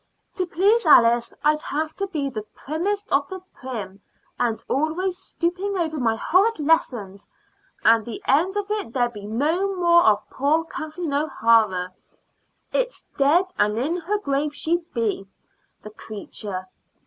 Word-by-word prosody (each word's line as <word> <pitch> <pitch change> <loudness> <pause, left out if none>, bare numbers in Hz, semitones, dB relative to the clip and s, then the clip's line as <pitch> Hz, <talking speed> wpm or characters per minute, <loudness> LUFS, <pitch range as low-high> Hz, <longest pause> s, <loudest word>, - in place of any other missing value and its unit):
To 365 -2 -2
please 405 +7 +3
Alice 235 -4 +6
I'd 300 +1 +3
have 310 +2 -3
to 395 - -2
be 300 -7 -2
the 230 -6 -4
primmest 395 +8 -2
of 280 0 +2
the 375 - -6
prim, 205 -7 -7 0.4
and 235 -2 0
always 325 +6 0
stooping 375 +3 -2
over 320 -3 -1
my 225 -3 +1
horrid 380 - +2
lessons, 240 -11 0 0.6
and 225 0 +5
the 230 0 -6
end 350 +9 +2
of 410 0 -3
it 420 - -3
there'd 245 -2 +1
be 205 -1 -8
no 325 - 0
more 345 -1 +5
of 210 -5 +3
poor 295 +4 +1
Kathleen 315 -1 -5
O'Hara 225 -10 +2 0.8
it's - - -1
dead 300 +7 +4
and 210 +1 +2
in 290 +8 0
her 365 +5 -1
grave 290 -5 -1
she'd 335 +2 -2
be, 215 -5 -2 0.6
the 215 - -9
creature. 205 -3 -7
295 Hz, 150 wpm, -23 LUFS, 230-350 Hz, 0.8 s, Alice